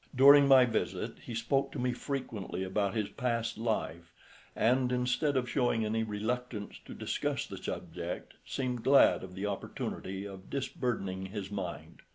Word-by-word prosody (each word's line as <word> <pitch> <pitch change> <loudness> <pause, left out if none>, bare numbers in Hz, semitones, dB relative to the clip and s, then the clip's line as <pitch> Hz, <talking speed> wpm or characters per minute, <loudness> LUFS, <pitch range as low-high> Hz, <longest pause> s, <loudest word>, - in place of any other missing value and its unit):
During 140 +2 +8
my 130 -2 +8
visit 115 -2 -2
he 115 - -4
spoke 135 +4 +1
to - - -5
me 125 -1 0
frequently 120 -8 -4
about 95 +1 0
his 105 -2 0
past 115 -2 -2
life, 85 -7 -2 0.4
and 125 +2 +3
instead 125 +3 +1
of 125 -1 0
showing 120 -4 +1
any 110 +1 0
reluctance 110 +1 -3
to - - -9
discuss - - -2
the - - -8
subject, - - -5
seemed 125 -3 -3
glad 140 -6 +6
of 90 -1 -9
the 95 +2 -3
opportunity 95 -1 -4
of 95 -1 -9
disburdening 105 -8 -2
his 100 0 -6
mind. 85 -5 -6
115 Hz, 155 wpm, -31 LUFS, 100-125 Hz, 0.4 s, During